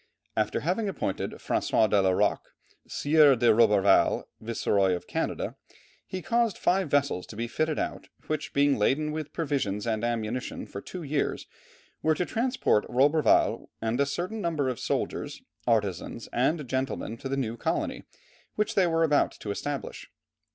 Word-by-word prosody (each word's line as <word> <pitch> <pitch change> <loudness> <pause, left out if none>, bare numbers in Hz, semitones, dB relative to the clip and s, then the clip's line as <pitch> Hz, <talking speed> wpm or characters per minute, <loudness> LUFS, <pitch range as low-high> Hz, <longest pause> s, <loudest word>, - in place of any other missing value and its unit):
After 110 -1 0
having 190 +6 0
appointed 95 - -2
François 110 - +1
de 105 -1 +3
la 95 - +3
Roque, 90 - 0 0.3
Sieur 145 -2 +5
de 120 -1 +4
Roberval, 105 -3 +4 0.2
viceroy 100 -4 +1
of 90 - -7
Canada, - - -3 0.5
he 185 -2 -5
caused 230 +4 +1
five 185 -3 +1
vessels 140 -10 +1
to - - -10
be 115 +2 -3
fitted 155 +5 -1
out, - - -3 0.2
which 155 -1 -3
being 140 0 +3
laden 150 +8 +1
with 155 -1 -5
provisions 135 - -1
and 110 -1 -1
ammunition 120 +1 -2
for 100 - -8
two 180 - -7
years, 145 0 -1 0.6
were 155 0 +2
to 180 - -1
transport 240 - +1
Roberval 145 +5 +3
and 115 +4 0
a 140 - +2
certain 180 +9 -3
number 155 -7 0
of 125 - -4
soldiers, - - -3 0.2
artizans, 105 -1 -1
and 140 +4 +1
gentlemen 130 -3 -2
to 135 - -6
the 135 - -1
new 115 -4 -2
colony, - - -2 0.5
which 210 0 0
they 190 -3 +3
were 165 0 +2
about 150 -3 +3
to 105 - -6
establish. 140 +6 -5
135 Hz, 160 wpm, -27 LUFS, 110-160 Hz, 0.6 s, Sieur